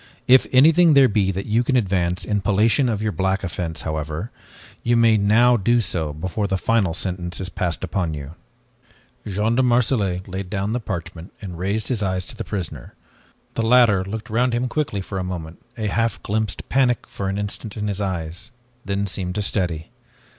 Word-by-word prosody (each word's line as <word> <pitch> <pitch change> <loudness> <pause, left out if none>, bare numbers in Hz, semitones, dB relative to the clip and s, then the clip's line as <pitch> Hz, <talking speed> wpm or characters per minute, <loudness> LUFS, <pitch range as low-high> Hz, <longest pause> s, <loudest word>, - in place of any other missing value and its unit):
If 130 +1 +6
anything 155 +4 +6
there 135 -1 +7
be 100 -3 +1
that 95 +1 -3
you 115 +3 +2
can 130 +2 0
advance 90 -6 0
in 105 -1 0
palliation 110 +7 +3
of 110 -2 -1
your 110 - 0
black 95 +2 0
offense, 85 -3 -4
however, 80 +6 -4 0.5
you 120 0 +2
may 115 -1 +5
now 115 +4 +4
do 120 +4 +2
so 85 -8 -1
before 95 +7 -3
final 95 -2 +1
sentence 90 -2 -3
is 95 0 -3
passed 90 -1 -2
upon 90 -3 -1
you." 70 +1 -8 0.9
Jean 105 +3 0
de 125 - +3
Marselait 115 -7 +1
laid 95 0 -5
down 100 +2 -2
the 125 - 0
parchment, 85 -5 -6
and 90 -5 -7
raised 100 +4 -1
his 120 -5 0
eyes 95 -2 -1
to - - -5
the - - -5
prisoner. 80 - -6 0.6
The - - -1
latter 115 -4 +5
looked 110 +3 -6
round 120 +2 +2
him 125 +2 0
quickly 125 -7 -2
for 95 0 -5
a - - -2
moment, 85 -3 -6 0.2
a 110 - -3
half 115 +1 -1
glimpsed 110 -1 -2
panic 125 -3 +2
for 95 -1 -4
an 95 - -2
instant 105 +1 -4
in 105 0 -2
his 100 0 -2
eyes, 85 -3 -4 0.3
then 100 +1 -1
seemed 90 -1 -4
to 105 - -1
steady. 90 -4 -2
100 Hz, 190 wpm, -22 LUFS, 90-115 Hz, 0.9 s, there